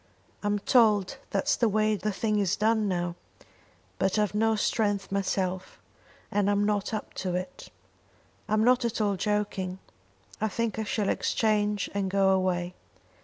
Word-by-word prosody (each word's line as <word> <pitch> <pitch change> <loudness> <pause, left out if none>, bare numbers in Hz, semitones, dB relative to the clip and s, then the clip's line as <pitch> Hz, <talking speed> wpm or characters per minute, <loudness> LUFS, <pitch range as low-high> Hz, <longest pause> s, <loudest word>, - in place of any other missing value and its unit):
"I'm 205 0 0
told 210 -3 +3
that's 290 - +1
the 235 - +2
way 215 +1 +2
the 210 +1 -2
thing 210 +1 0
is 195 -4 +1
done 220 0 +2
now; 175 -2 -1 0.9
but 190 +2 +1
I've 210 -2 +1
no 220 +1 +2
strength 205 -2 0
myself, 185 -1 -2 0.5
and 205 -1 +2
I'm 205 0 +2
not 205 -1 0
up 215 -1 -5
to 185 -2 -2
it. 180 0 -6 0.8
I'm 215 +1 +2
not 250 +1 +4
at 235 0 -1
all 205 -2 +1
joking. 200 -2 -2 0.6
I 220 - +2
think 225 +1 -2
I 220 - -2
shall 205 -1 -1
exchange 210 -2 +1
and 200 -1 -1
go 195 0 +3
away. 180 -2 0
205 Hz, 155 wpm, -28 LUFS, 190-215 Hz, 0.9 s, not